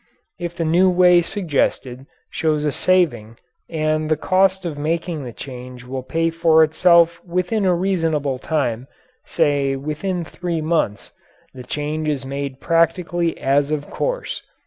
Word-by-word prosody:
If 175 Hz, -1 st, -5 dB
the 165 Hz, -, -2 dB
new 175 Hz, +4 st, +4 dB
way 180 Hz, -1 st, +5 dB
suggested 145 Hz, -, -2 dB, 0.2 s
shows 155 Hz, -2 st, 0 dB
a 150 Hz, -, +1 dB
saving 120 Hz, -12 st, +1 dB, 0.3 s
and 155 Hz, -1 st, -1 dB
the 155 Hz, -, +2 dB
cost 190 Hz, +2 st, +2 dB
of 165 Hz, -3 st, -3 dB
making 160 Hz, +1 st, -2 dB
the 120 Hz, -, -6 dB
change 125 Hz, 0 st, -9 dB
will 130 Hz, +1 st, -5 dB
pay 165 Hz, +5 st, -1 dB
for 160 Hz, -1 st, +4 dB
itself 170 Hz, +1 st, +4 dB
within 185 Hz, +4 st, -1 dB
a 180 Hz, -1 st, +3 dB
reasonable 165 Hz, -7 st, 0 dB
time 125 Hz, -6 st, -2 dB, 0.4 s
say 145 Hz, -4 st, +1 dB
within 155 Hz, +6 st, -3 dB
three 175 Hz, 0 st, -4 dB
months 155 Hz, -10 st, -1 dB, 0.4 s
the 130 Hz, -, -9 dB
change 150 Hz, +4 st, -3 dB
is 140 Hz, -3 st, -2 dB
made 140 Hz, 0 st, -5 dB
practically 170 Hz, +1 st, +1 dB
as 140 Hz, +1 st, +2 dB
of 150 Hz, -1 st, -3 dB
course. -, -, -3 dB
155 Hz, 145 wpm, -20 LUFS, 140-175 Hz, 0.4 s, way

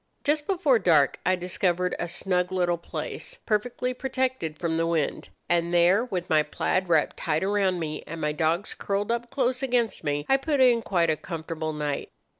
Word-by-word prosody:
Just 295 Hz, 0 st, 0 dB
before 320 Hz, -, +3 dB
dark 155 Hz, -8 st, +3 dB
I 185 Hz, -, +4 dB
discovered 180 Hz, 0 st, 0 dB
a 175 Hz, -, -2 dB
snug 180 Hz, +1 st, -1 dB
little 175 Hz, -2 st, +1 dB
place, -, -, -6 dB
perfectly 245 Hz, +3 st, -1 dB
protected 260 Hz, -, -2 dB
from 165 Hz, -1 st, -1 dB
the 165 Hz, 0 st, +1 dB
wind; 165 Hz, -3 st, -1 dB, 0.2 s
and 170 Hz, 0 st, +1 dB
there, 175 Hz, +6 st, +4 dB
with 185 Hz, -7 st, -3 dB
my 155 Hz, -1 st, +4 dB
plaid 180 Hz, +4 st, -1 dB
wrapped 160 Hz, -3 st, +2 dB
tight 155 Hz, 0 st, -1 dB
around 195 Hz, -2 st, +1 dB
me, 155 Hz, -2 st, -4 dB
and 165 Hz, +1 st, -6 dB
my 150 Hz, -1 st, 0 dB
dogs 165 Hz, +5 st, 0 dB
curled 200 Hz, +2 st, -2 dB
up 235 Hz, 0 st, -2 dB
close 255 Hz, 0 st, 0 dB
against 245 Hz, -7 st, 0 dB
me, 145 Hz, -1 st, -1 dB
I 270 Hz, -, +4 dB
put 285 Hz, +1 st, -1 dB
in 245 Hz, -3 st, +5 dB
quite 170 Hz, -6 st, +1 dB
a -, -, +1 dB
comfortable 160 Hz, -1 st, -5 dB
night. 150 Hz, -2 st, -3 dB
180 Hz, 185 wpm, -26 LUFS, 165-240 Hz, 0.2 s, in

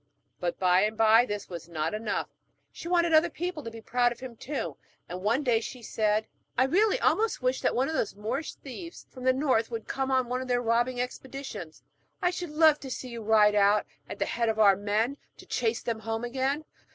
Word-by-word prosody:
But, 175 Hz, -1 st, -2 dB
by 180 Hz, 0 st, +4 dB
and 215 Hz, +1 st, 0 dB
by, 225 Hz, +2 st, +6 dB
this 205 Hz, 0 st, -4 dB
was 170 Hz, -2 st, -8 dB
not 160 Hz, +1 st, -2 dB
enough; 215 Hz, 0 st, -2 dB, 0.4 s
she -, -, -9 dB
wanted 340 Hz, -1 st, +2 dB
other 315 Hz, +2 st, +5 dB
people 350 Hz, 0 st, -4 dB
to 230 Hz, -, -6 dB
be 225 Hz, 0 st, -10 dB
proud 245 Hz, +2 st, +2 dB
of 240 Hz, -, -8 dB
him 255 Hz, -2 st, -8 dB
too, 230 Hz, -, -4 dB, 0.3 s
and 180 Hz, +1 st, -6 dB
one 230 Hz, +8 st, +1 dB
day 240 Hz, -4 st, +3 dB
she 245 Hz, +1 st, -8 dB
said: 215 Hz, 0 st, +1 dB, 0.3 s
'I 255 Hz, -, +5 dB
really 400 Hz, -, +3 dB
almost 440 Hz, -, +1 dB
wish 255 Hz, +1 st, +1 dB
that -, -, +1 dB
those 265 Hz, -4 st, 0 dB
Moorish 235 Hz, +9 st, -3 dB
thieves 335 Hz, +6 st, -9 dB
from 255 Hz, -1 st, -9 dB
the 260 Hz, -, +6 dB
north 255 Hz, -4 st, +1 dB
would 230 Hz, -2 st, -5 dB
come 270 Hz, 0 st, -2 dB
on 260 Hz, -2 st, +2 dB
one 250 Hz, +1 st, -2 dB
of 260 Hz, -, -6 dB
their 245 Hz, -1 st, +2 dB
robbing 240 Hz, +1 st, +1 dB
expeditions. 250 Hz, -, -6 dB, 0.4 s
I 355 Hz, -, +2 dB
should 355 Hz, -2 st, -5 dB
love 310 Hz, 0 st, +5 dB
so -, -, -33 dB
to 270 Hz, -, -7 dB
see 255 Hz, 0 st, -5 dB
you 235 Hz, -1 st, -6 dB
ride 210 Hz, -1 st, +5 dB
out 205 Hz, 0 st, +4 dB, 0.2 s
at -, -, -6 dB
the -, -, 0 dB
head 235 Hz, -1 st, 0 dB
of 220 Hz, -, -1 dB
our 205 Hz, -3 st, +6 dB
men, 215 Hz, +7 st, 0 dB, 0.2 s
to -, -, -13 dB
chase 230 Hz, -1 st, -1 dB
them 230 Hz, -2 st, -2 dB
home 225 Hz, +1 st, -3 dB
again. 270 Hz, +5 st, -1 dB
240 Hz, 220 wpm, -28 LUFS, 215-270 Hz, 0.4 s, by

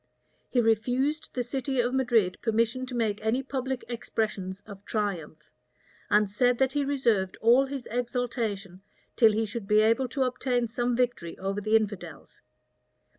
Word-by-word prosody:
[*] -, -, -42 dB
He 250 Hz, -, +1 dB
refused 245 Hz, +7 st, +1 dB
the 250 Hz, -, 0 dB
city 265 Hz, +1 st, -2 dB
of 245 Hz, +1 st, +1 dB
Madrid 235 Hz, -8 st, +2 dB
permission 230 Hz, +3 st, 0 dB
to 255 Hz, -, -6 dB
make 220 Hz, -3 st, 0 dB
any 225 Hz, +5 st, 0 dB
public 265 Hz, -1 st, -3 dB
expressions 210 Hz, -5 st, -3 dB
of 200 Hz, -2 st, -12 dB
triumph; 175 Hz, -9 st, -4 dB, 0.6 s
and 210 Hz, 0 st, +4 dB
said 245 Hz, +5 st, +2 dB
that 265 Hz, +1 st, +2 dB
he 290 Hz, -1 st, +1 dB
reserved 235 Hz, -9 st, +1 dB
all 245 Hz, +4 st, +5 dB
his 270 Hz, -2 st, -6 dB
exultation 230 Hz, -6 st, -2 dB, 0.3 s
till 225 Hz, -3 st, +6 dB
he 220 Hz, +1 st, 0 dB
should 210 Hz, -1 st, -6 dB
he 210 Hz, 0 st, +5 dB
able 230 Hz, +4 st, +3 dB
to 265 Hz, +2 st, -1 dB
obtain 250 Hz, -1 st, 0 dB
some 240 Hz, +2 st, -1 dB
victory 240 Hz, -9 st, -1 dB
over 195 Hz, +2 st, -3 dB
the 215 Hz, +2 st, +2 dB
infidels. 210 Hz, -3 st, -3 dB
235 Hz, 160 wpm, -27 LUFS, 210-255 Hz, 0.6 s, till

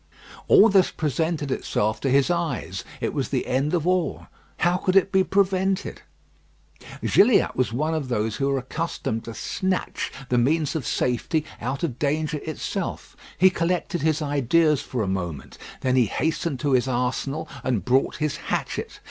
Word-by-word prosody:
All 210 Hz, -, +7 dB
this 195 Hz, -3 st, +4 dB
presented 155 Hz, -1 st, -1 dB
itself 110 Hz, -4 st, -1 dB
to 135 Hz, -, 0 dB
his 140 Hz, +5 st, +3 dB
eyes. 170 Hz, -8 st, -2 dB, 0.2 s
It -, -, -1 dB
was -, -, -2 dB
the -, -, -1 dB
end 140 Hz, +6 st, 0 dB
of 165 Hz, -2 st, -1 dB
all. 180 Hz, -1 st, 0 dB, 0.4 s
How 175 Hz, +1 st, +3 dB
could 185 Hz, 0 st, 0 dB
it 195 Hz, 0 st, +4 dB
be 190 Hz, -1 st, +4 dB
prevented? 190 Hz, 0 st, 0 dB, 1.0 s
Gilliatt 215 Hz, +1 st, +4 dB
was 130 Hz, -3 st, 0 dB
one 155 Hz, +7 st, -1 dB
of 155 Hz, -4 st, -2 dB
those 110 Hz, -3 st, -1 dB
who 140 Hz, 0 st, 0 dB
are 140 Hz, -, +1 dB
accustomed 130 Hz, -4 st, -3 dB
to 115 Hz, -, -7 dB
snatch 185 Hz, -, -2 dB, 0.2 s
the 125 Hz, -, +3 dB
means 150 Hz, +5 st, +1 dB
of 150 Hz, -6 st, -2 dB
safety 135 Hz, +5 st, 0 dB, 0.2 s
out 135 Hz, +3 st, -3 dB
of 135 Hz, -6 st, -2 dB
danger 150 Hz, +1 st, 0 dB
itself. 155 Hz, +1 st, -5 dB, 0.2 s
He 185 Hz, +1 st, +6 dB
collected 175 Hz, -1 st, -1 dB
his 155 Hz, 0 st, +1 dB
ideas 145 Hz, +2 st, +2 dB
for 125 Hz, -4 st, -3 dB
a -, -, -2 dB
moment. 85 Hz, -8 st, -4 dB, 0.2 s
Then 130 Hz, -1 st, +1 dB
he 125 Hz, -2 st, +5 dB
hastened 155 Hz, -, -1 dB
to 145 Hz, -2 st, 0 dB
his 130 Hz, 0 st, +3 dB
arsenal 130 Hz, +5 st, -1 dB, 0.2 s
and 115 Hz, -8 st, -1 dB
brought 130 Hz, +2 st, +2 dB
his 150 Hz, -2 st, -2 dB
hatchet. -, -, -4 dB
150 Hz, 165 wpm, -24 LUFS, 130-170 Hz, 1.0 s, All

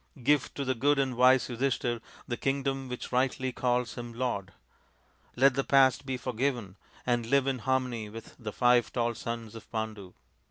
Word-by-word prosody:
Give 145 Hz, +1 st, +3 dB
to 140 Hz, -, -3 dB
the 130 Hz, -, +1 dB
good 140 Hz, +4 st, +2 dB
and 135 Hz, -2 st, 0 dB
wise 130 Hz, +1 st, +5 dB
Yudhishthir 120 Hz, -1 st, -1 dB, 0.3 s
the 120 Hz, -, -1 dB
kingdom 135 Hz, 0 st, -1 dB
which 125 Hz, -, -6 dB
rightly 130 Hz, +1 st, +1 dB
calls 125 Hz, -1 st, 0 dB
him 120 Hz, -1 st, -7 dB
lord. 115 Hz, -6 st, -2 dB, 0.8 s
Let 135 Hz, +2 st, +5 dB
the 135 Hz, +1 st, 0 dB
past 135 Hz, 0 st, +4 dB
be 130 Hz, -1 st, -1 dB
forgiven 125 Hz, -5 st, -2 dB, 0.3 s
and 120 Hz, -2 st, +1 dB
live 140 Hz, +2 st, +3 dB
in 135 Hz, -2 st, -1 dB
harmony 125 Hz, -4 st, -1 dB
with 115 Hz, +1 st, -10 dB
the 110 Hz, -3 st, -5 dB
five 120 Hz, +1 st, +3 dB
tall 120 Hz, -1 st, 0 dB
sons 115 Hz, -2 st, -5 dB
of 115 Hz, -1 st, -12 dB
Pandu." 110 Hz, -4 st, -5 dB
125 Hz, 170 wpm, -29 LUFS, 115-130 Hz, 0.8 s, wise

